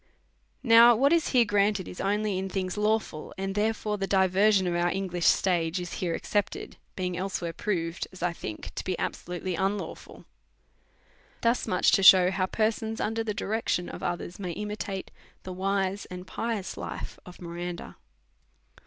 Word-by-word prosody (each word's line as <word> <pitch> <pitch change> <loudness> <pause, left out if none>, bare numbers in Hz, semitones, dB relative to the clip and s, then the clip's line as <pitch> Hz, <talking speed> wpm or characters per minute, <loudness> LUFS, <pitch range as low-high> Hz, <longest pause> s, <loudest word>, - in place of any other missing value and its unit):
Now 235 -1 +8
what 275 +7 +4
is 335 -2 +2
here 245 -3 +4
granted 205 -2 +1
is 180 - -7
only 205 -1 0
in 190 0 -3
things 185 -1 -2
lawful, 210 -7 -1
and 195 0 -3
therefore 210 0 -1
the 195 - -1
diversion 190 +1 +3
of 175 - 0
our 175 0 +1
English 180 -2 -1
stage 175 -2 +2
is 175 -1 -6
here 170 -3 -2
excepted, 205 -1 -2 0.2
being 180 -1 -2
elsewhere 180 -2 -3
proved, 165 -3 -2
as 185 -2 -9
I 175 -1 +1
think, 110 -10 -7
to - - -5
be 185 -2 -2
absolutely 180 +1 -4
unlawful. 195 +4 -3 1.2
Thus 235 +1 +1
much 180 - +3
to - - +4
shew 185 -1 +8
how 190 -1 0
persons 220 +1 -1
under 225 +1 -1
the 210 -2 -3
direc 220 +3 -2
tion 175 - 0
of - - -8
others 175 +1 -4
may 180 -3 -4
imitate 210 -1 -5 0.3
the 185 - -6
wise 195 +1 -1
and 180 0 -8
pious 225 -2 -3
life - - -6
of 180 - -13
Miranda. 175 0 -6
190 Hz, 165 wpm, -28 LUFS, 180-210 Hz, 1.2 s, Now